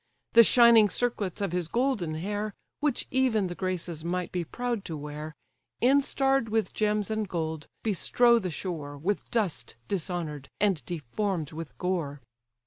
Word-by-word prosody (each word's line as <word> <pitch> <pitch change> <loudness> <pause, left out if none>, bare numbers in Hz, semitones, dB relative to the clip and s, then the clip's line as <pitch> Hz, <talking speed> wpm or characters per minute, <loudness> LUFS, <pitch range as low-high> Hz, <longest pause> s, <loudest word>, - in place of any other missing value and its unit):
The 230 - +10
shining 230 -2 +7
circlets 210 -6 -1
of 200 - 0
his 175 -2 -1
golden 230 - 0
hair, 205 +5 -3 0.2
Which 295 -4 0
even 255 -6 +2
the 175 - -3
Graces 175 -3 -3
might 180 +1 -2
be 180 -1 -1
proud 240 +4 -3
to 160 -3 -4
wear, 150 +1 -7 0.4
Instarr'd 270 -1 +3
with 220 0 0
gems 210 0 0
and 215 -2 -1
gold, 160 -3 -3 0.2
bestrow 235 +3 +4
the 185 -4 -3
shore, 155 -4 -5
With 190 +8 -2
dust 195 - -1
dishonour'd, 165 -7 -3
and 195 - +2
deform'd 170 - -2
with 160 -1 -8
gore. 170 -6 -2
190 Hz, 145 wpm, -28 LUFS, 160-225 Hz, 0.4 s, The